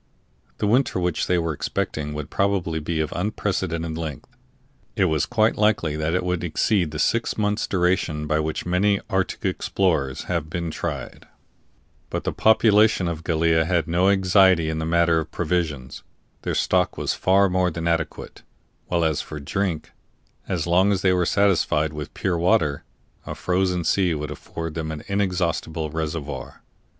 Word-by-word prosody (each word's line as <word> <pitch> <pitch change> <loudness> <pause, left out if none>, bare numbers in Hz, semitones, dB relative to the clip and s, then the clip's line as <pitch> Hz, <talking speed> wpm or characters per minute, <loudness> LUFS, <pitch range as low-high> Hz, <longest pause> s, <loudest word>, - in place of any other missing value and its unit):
The - - -1
winter 115 -2 +2
which 90 -2 -1
they 90 - +2
were 80 -2 -1
expecting 75 +1 -3
would 75 -2 -6
probably 95 -5 0
be 80 +1 -2
of 75 - -3
unprecedented 85 -4 -2
length; 80 -5 -7 0.6
it - - +3
was 80 -4 +1
quite 110 0 +2
likely 105 -8 +2
that 80 +2 -1
it 90 - 0
would 90 -1 -1
exceed 85 +2 +1
the 75 - -6
six 115 +9 0
months' 105 0 0
duration 90 -4 0
by 75 +1 +1
which 80 0 -2
many 95 +3 +2
arctic 95 -1 -1
explorers 80 -9 0
have 85 -3 -2
been 85 -1 -3
tried; 70 -8 -5 0.8
but - - -3
the - - -2
population 110 -3 +4
of 80 -1 -4
Gallia 80 -1 +2
had 85 0 0
no 90 +3 +3
anxiety 95 -4 +4
in 80 - -3
the 80 - -2
matter 85 0 +3
of 80 - -5
provisions 80 -6 -2 0.4
their - - -2
stock 90 -1 +1
was - - -1
far 100 +1 +3
more 90 -1 +1
than 85 0 -4
adequate; 85 -2 -2 0.5
while 85 -2 +1
as 80 -2 +1
for 75 - -8
drink, 85 +2 -2 0.6
as 90 -3 -1
long 90 +4 +3
as 95 -2 0
they 95 -1 +4
were 90 -2 +1
satisfied 85 -6 +2
with 75 -1 -7
pure 90 -3 -1
water, 80 -4 +2 0.4
a - - -4
frozen 90 -1 0
sea 90 +1 +2
would 75 0 -4
afford 80 -1 -6
them 80 0 -4
an 75 -1 -6
inexhaustible 85 -5 -1
reservoir. 75 -4 -5
85 Hz, 165 wpm, -23 LUFS, 80-95 Hz, 0.8 s, population